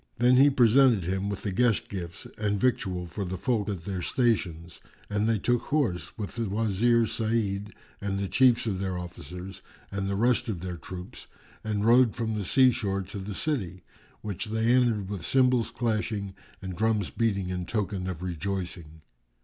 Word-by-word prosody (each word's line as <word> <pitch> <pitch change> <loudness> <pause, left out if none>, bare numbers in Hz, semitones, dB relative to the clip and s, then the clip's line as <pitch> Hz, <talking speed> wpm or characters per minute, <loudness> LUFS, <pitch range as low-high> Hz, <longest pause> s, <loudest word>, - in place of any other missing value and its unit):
Then 125 +2 +5
he 140 +2 +7
presented 125 -4 +5
him 95 +3 -1
with 100 - -5
the 100 - -2
guest 115 +2 +2
gifts 85 -4 -7
and 105 -1 0
victual 95 -7 0
for 90 +4 -5
the 95 0 -4
folk 110 -4 0
at 90 -5 -4
their 95 -3 -3
stations; 90 -8 -1 0.3
and 105 +2 +1
they 115 - +3
took 120 +4 +1
horse, 130 -13 -1
with 105 -3 -5
the 115 -3 -1
Wazir 115 +3 +2
Sa'id 105 -3 -1 0.3
and 100 -1 -2
the 100 0 -1
chiefs 125 +2 +4
of 100 -5 -1
their 95 -2 -2
officers 90 +1 -8 0.3
and 100 0 -2
the 100 - -1
rest 120 +5 +2
of 95 -6 -3
their 90 -1 -5
troops, 90 +2 -9 0.4
and 105 -1 -1
rode 120 0 +5
from 115 -2 -2
the 105 -2 -3
sea 130 +6 +5
shore 100 -5 -2
to 100 +2 -7
the 95 +1 -6
city, 95 - -2 0.4
which 100 -5 -4
they 110 +2 +1
entered 115 -6 +2
with 100 -3 -5
cymbals 125 +2 +3
clashing 110 -4 -2 0.3
and 95 -1 -5
drums 110 -2 0
beating 100 -5 0
in 90 -1 -3
token 95 -3 -2
of 90 -1 -5
rejoicing. 85 -3 -4
100 Hz, 180 wpm, -27 LUFS, 95-115 Hz, 0.4 s, he